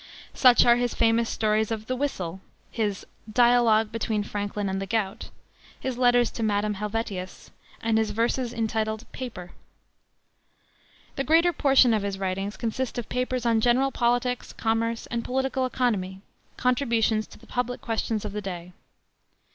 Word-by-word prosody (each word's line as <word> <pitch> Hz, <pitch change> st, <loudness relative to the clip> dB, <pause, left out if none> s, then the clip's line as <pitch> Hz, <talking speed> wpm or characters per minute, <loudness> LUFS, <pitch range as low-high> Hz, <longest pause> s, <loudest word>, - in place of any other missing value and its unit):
Such 250 Hz, -2 st, +6 dB
are 240 Hz, 0 st, +6 dB
his 245 Hz, -1 st, -1 dB
famous 230 Hz, 0 st, +2 dB
story 215 Hz, -1 st, +1 dB
of 220 Hz, 0 st, -3 dB
the 255 Hz, -, -2 dB
Whistle, 190 Hz, -10 st, -3 dB, 0.3 s
his 210 Hz, -4 st, -2 dB, 0.3 s
Dialogue 235 Hz, -2 st, +4 dB
between 220 Hz, -2 st, -1 dB
Franklin 205 Hz, 0 st, -3 dB
and 190 Hz, 0 st, -2 dB
the 195 Hz, -, -4 dB
Gout, 205 Hz, -2 st, -2 dB, 0.5 s
his 260 Hz, -2 st, -3 dB
letters 245 Hz, -1 st, +3 dB
to -, -, -6 dB
Madame 210 Hz, -1 st, +1 dB
Helvetius, 205 Hz, -2 st, -5 dB, 0.3 s
and 225 Hz, -1 st, +2 dB
his 220 Hz, -1 st, 0 dB
verses 235 Hz, +3 st, 0 dB
entitled 220 Hz, -1 st, -2 dB
Paper. 200 Hz, -9 st, -7 dB, 1.7 s
The 275 Hz, -, 0 dB
greater 335 Hz, +4 st, +4 dB
portion 270 Hz, -6 st, +4 dB
of 215 Hz, -, +1 dB
his 200 Hz, -1 st, -3 dB
writings 195 Hz, +2 st, -3 dB
consists 240 Hz, +2 st, -3 dB
of 240 Hz, -, -4 dB
papers 250 Hz, -1 st, -2 dB
on 230 Hz, -1 st, +3 dB
general 255 Hz, +4 st, +3 dB
politics, 245 Hz, 0 st, 0 dB
commerce, 225 Hz, 0 st, -1 dB
and 235 Hz, 0 st, -1 dB
political 265 Hz, 0 st, -1 dB
economy, 200 Hz, -7 st, -1 dB, 0.4 s
contributions 235 Hz, -4 st, +1 dB
to -, -, -15 dB
the -, -, -18 dB
public 245 Hz, 0 st, -2 dB
questions 220 Hz, -1 st, -2 dB
of 205 Hz, -, -5 dB
his 210 Hz, -, -3 dB
day. 180 Hz, -2 st, -7 dB
225 Hz, 150 wpm, -26 LUFS, 210-245 Hz, 1.7 s, Such